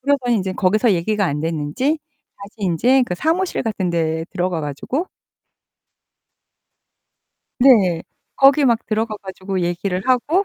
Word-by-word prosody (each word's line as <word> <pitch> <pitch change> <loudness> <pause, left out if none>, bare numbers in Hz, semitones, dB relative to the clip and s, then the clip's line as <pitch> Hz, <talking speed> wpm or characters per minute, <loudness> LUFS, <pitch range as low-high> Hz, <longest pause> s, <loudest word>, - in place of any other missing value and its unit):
그러더니 260 -3 +1
인제 190 -2 -2
거기서 210 +4 +2
얘기가 200 +3 0
안 145 -1 -2
됐는지 165 - -1 0.4
다시 200 0 -11
인제 220 +8 +2
그 180 - -3
사무실 335 - -1
같은 200 -5 -2
데 160 -1 -1
들어가 180 -2 -2
가지고 155 - -3 2.5
네. 200 -11 +4 0.3
거기 275 +2 +5
막 235 -1 +1
들어가 215 0 -1
가지고 190 -1 -5
얘기를 180 +2 -2
하고 295 +10 +2
200 Hz, 275 characters per minute, -20 LUFS, 175-255 Hz, 2.5 s, 거기